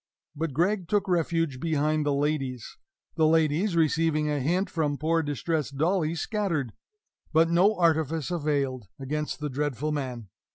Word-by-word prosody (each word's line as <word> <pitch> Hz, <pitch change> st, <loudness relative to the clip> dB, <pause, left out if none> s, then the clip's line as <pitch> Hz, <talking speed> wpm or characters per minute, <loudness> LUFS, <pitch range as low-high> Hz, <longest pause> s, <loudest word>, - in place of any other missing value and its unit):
But 160 Hz, -1 st, -3 dB
Gregg 180 Hz, +4 st, +1 dB
took 205 Hz, 0 st, +1 dB
refuge 165 Hz, -5 st, 0 dB
behind 155 Hz, 0 st, 0 dB
the 145 Hz, -, +2 dB
ladies. 140 Hz, -4 st, -2 dB, 0.4 s
The 160 Hz, -1 st, +4 dB
ladies, 160 Hz, +4 st, +2 dB
receiving 155 Hz, -1 st, +2 dB
a 145 Hz, -, 0 dB
hint 175 Hz, +9 st, +1 dB
from 150 Hz, -3 st, -1 dB
poor 165 Hz, +2 st, +1 dB
distressed 145 Hz, -1 st, -2 dB
Dolly, 165 Hz, +1 st, +1 dB
scattered. 170 Hz, -, -1 dB, 0.6 s
But 165 Hz, +1 st, +4 dB
no 190 Hz, +6 st, +4 dB
artifice 160 Hz, -2 st, +1 dB
availed 140 Hz, -, -1 dB
against 150 Hz, +3 st, -3 dB
the 150 Hz, -, -2 dB
dreadful 145 Hz, +1 st, -2 dB
man. 125 Hz, -7 st, -4 dB
155 Hz, 140 wpm, -27 LUFS, 145-165 Hz, 0.6 s, The